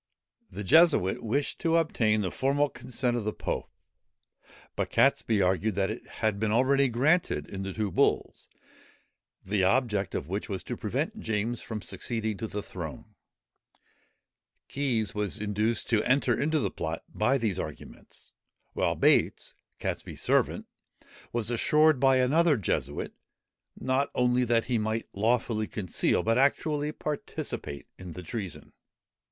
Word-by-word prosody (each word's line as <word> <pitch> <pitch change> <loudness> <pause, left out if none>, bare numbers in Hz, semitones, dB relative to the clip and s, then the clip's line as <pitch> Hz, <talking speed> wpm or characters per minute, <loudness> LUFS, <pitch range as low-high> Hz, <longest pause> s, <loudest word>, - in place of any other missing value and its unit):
] - - -60
The 105 - -6
Jesuit 150 - +4
wished 135 +6 -1
to 165 -1 +1
obtain 110 -10 +2
the 95 - -2
formal 140 +2 +1
consent 125 -1 -2
of 120 - -2
the 105 - -1
pope; - - -4 1.1
but - - -1
Catesby 105 -4 +3
argued 95 +3 +1
that 95 +1 +1
it 110 - -8 0.2
had 110 -2 +1
been 110 0 0
already 135 +4 +4
granted, 150 +10 +2
in 95 - -6
the 95 0 -4
two 105 -1 -2
bulls, - - 0 1.0
the 100 0 +1
object 105 -2 +1
of 70 - -3
which 100 +6 -4
was 95 -2 -3
to - - -4
prevent - - -3
James 110 +2 -2
from 110 -3 -6
succeeding 110 +3 -3
to 110 - -4
the 105 -1 -5
throne. 80 -6 -8 1.5
Keys 125 -7 -1
was 105 0 -3
induced 105 +2 -1
to 110 -2 +4
enter 130 +5 +2
into 155 +2 +1
the 150 - 0
plot 80 +1 -4
by 125 +6 +1
these 105 -7 -1
arguments; - - -9 0.4
while - - 0
Bates, - - +2 0.3
Catesby's - - -4
servant, - - +1 0.7
was 120 -1 -1
assured 150 +4 +4
by 135 0 +5
another 150 +4 +4
Jesuit, 75 - -2 0.7
not 130 +2 +1
only 125 0 +3
that 115 -1 +2
he 120 -2 0
might 110 +1 -2
lawfully 110 0 +1
conceal, 95 -4 0
but 115 +2 +2
actually 145 +2 +1
participate 145 - -5
in 90 -2 -8
the 90 - -8
treason. 95 +1 -6
115 Hz, 145 wpm, -28 LUFS, 100-130 Hz, 1.5 s, by